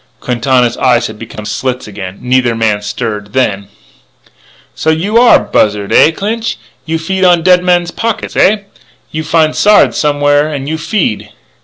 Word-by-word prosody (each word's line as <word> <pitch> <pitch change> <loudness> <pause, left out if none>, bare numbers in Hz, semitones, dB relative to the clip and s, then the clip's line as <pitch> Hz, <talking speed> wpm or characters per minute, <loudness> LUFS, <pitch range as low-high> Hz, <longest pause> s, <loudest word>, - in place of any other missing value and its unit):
Quintana's 125 0 0
eyes 120 -2 +2
had 110 -2 -7
become 110 -2 -9
slits 130 +2 -3
again. 95 -2 -8
Neither 125 -2 +1
man 110 -2 0
stirred. 105 0 -5
Then: 100 -6 -1 1.1
"So 160 - -2
you 190 +9 +1
are 245 0 +6
buzzard, 105 -1 0
eh, - - +6
Clinch? 220 - -3 0.3
You 165 +1 -1
feed 190 +4 -2
on 175 -2 +4
dead 180 0 +4
man's 175 -1 +1
pockets, 230 +2 -3
eh? 205 +2 +3 0.5
You 155 0 -4
find 155 0 +1
Sard 210 0 +4
somewhere 145 0 +1
an' 140 -3 -5
you 160 +2 -4
feed." 165 - -2
145 Hz, 155 wpm, -12 LUFS, 115-175 Hz, 1.1 s, are